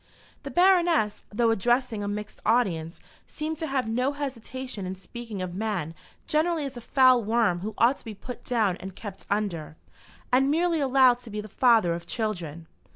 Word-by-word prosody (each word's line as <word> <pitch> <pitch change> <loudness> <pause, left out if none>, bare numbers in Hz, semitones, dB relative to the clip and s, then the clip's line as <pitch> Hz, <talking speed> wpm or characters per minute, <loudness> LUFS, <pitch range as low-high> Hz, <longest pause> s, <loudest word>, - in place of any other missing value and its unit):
The - - -7
Baroness, 350 - +3
though 230 +2 +2
addressing 240 +1 +1
a - - -3
mixed 210 +1 -5
audience, 180 -9 +1 0.3
seemed 310 +1 -4
to 320 0 -3
have 270 -4 -1
no 250 +5 0
hesitation 260 -6 -5
in 185 - -4
speaking 215 0 -7
of 180 -1 -5
man 195 -5 -2 0.3
generally 315 0 +1
as 275 -1 -6
a 240 - -7
foul 255 -1 +4
worm 220 -5 +2
who 210 +3 -5
ought 245 +4 +3
to - - -17
be 220 -2 -7
put 245 +5 -9
down 215 -7 +1
and 190 0 -9
kept 205 -4 -9
under, 175 -7 -2 0.5
and 265 +2 +4
merely 335 +2 +2
allowed 260 -3 +4
to 245 -2 -12
be 210 0 -4
the 210 - -6
father 220 -5 +4
of 170 0 -6
children. 175 -8 -3
230 Hz, 180 wpm, -26 LUFS, 200-265 Hz, 0.5 s, foul